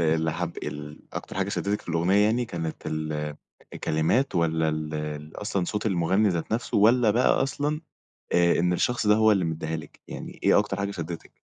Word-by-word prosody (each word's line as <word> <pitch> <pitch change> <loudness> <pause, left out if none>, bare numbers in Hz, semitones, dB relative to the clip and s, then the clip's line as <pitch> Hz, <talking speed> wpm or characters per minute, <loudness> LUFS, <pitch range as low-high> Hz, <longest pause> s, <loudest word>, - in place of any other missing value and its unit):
اللي 80 -1 +2
حاب 85 0 -4
ال 75 +1 -6
أكتر - - -6
حاجة 95 0 0
شدّتِك 100 0 -1
في - - -18
الأغنية 85 +4 +2
يعني، 120 +3 +2
كانت 80 -7 -5
ال 75 -1 -3 0.4
الكلمات 80 - +1
والّا 80 -2 +2
ال 75 +1 -4
أصلًا 100 -3 -1
صوت 105 +4 -2
المغني 95 +2 +2
ذات 85 +3 -2
نفسه؟ 120 +3 -1
والّا 115 +2 +5
بقى 120 +4 +3
أصلًا 145 +3 -1 0.5
آآ 85 0 +4
إن 90 +1 +2
الشخص 120 +5 0
ده 105 - +6
هو 110 0 +5
اللي 95 -4 +2
مدّيها 80 0 -2
لِك؟ 75 -2 -11
يعني - - -8
إيه - - +5
أكتر - - 0
حاجة 100 0 -2
شدّتِك؟ 85 -3 -6
85 Hz, 185 wpm, -26 LUFS, 80-105 Hz, 0.5 s, ده